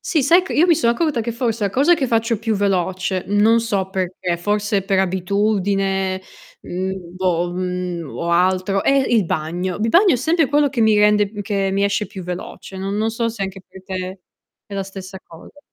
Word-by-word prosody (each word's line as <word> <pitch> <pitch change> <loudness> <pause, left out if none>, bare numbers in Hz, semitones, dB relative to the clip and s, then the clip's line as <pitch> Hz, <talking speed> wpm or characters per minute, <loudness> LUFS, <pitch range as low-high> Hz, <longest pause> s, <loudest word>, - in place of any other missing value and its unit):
sì 310 -5 0
sai 340 +7 +5
che 375 - -6
io 330 - +4
mi 340 - +5
sono 235 -4 +2
accorta 300 -2 0
che 230 +1 -3
forse 230 -2 -1
la 200 - 0
cosa 285 - +4
che 295 -5 -1
faccio 230 -2 +1
più 225 0 -1
veloce, 190 -1 -1
non 215 +3 +4
so 200 -4 -2
perché, 185 -2 -2
forse 205 +2 0
per 195 0 0
abitudine, 195 0 0 0.4
mhmm, 185 -1 -5
boh, 175 -1 0
mhmm, 180 -2 -3
o 170 - -2
altro, 185 +3 +2
è - - +3
il 240 -7 +2
bagno. 175 +4 -2
Il 220 +2 -1
bagno 370 - +5
è - - +2
sempre 320 +5 +2
quello 290 0 +3
che 255 -3 -2
mi 220 -1 +4
rende 210 -1 +4
m 210 - -6
che 195 -1 -1
mi 200 +1 +1
esce 200 +1 0
più 190 -1 -9
veloce, 180 +2 -7
non 195 +1 -3
non 220 +1 0
so 230 +1 -1
se 225 -3 -5
anche 195 0 -5
per 190 0 -14
te 185 0 -5 0.5
è 200 - -9
la 195 - -1
stessa 190 0 -9
cosa. 170 - -15
195 Hz, 205 wpm, -20 LUFS, 185-225 Hz, 0.5 s, sai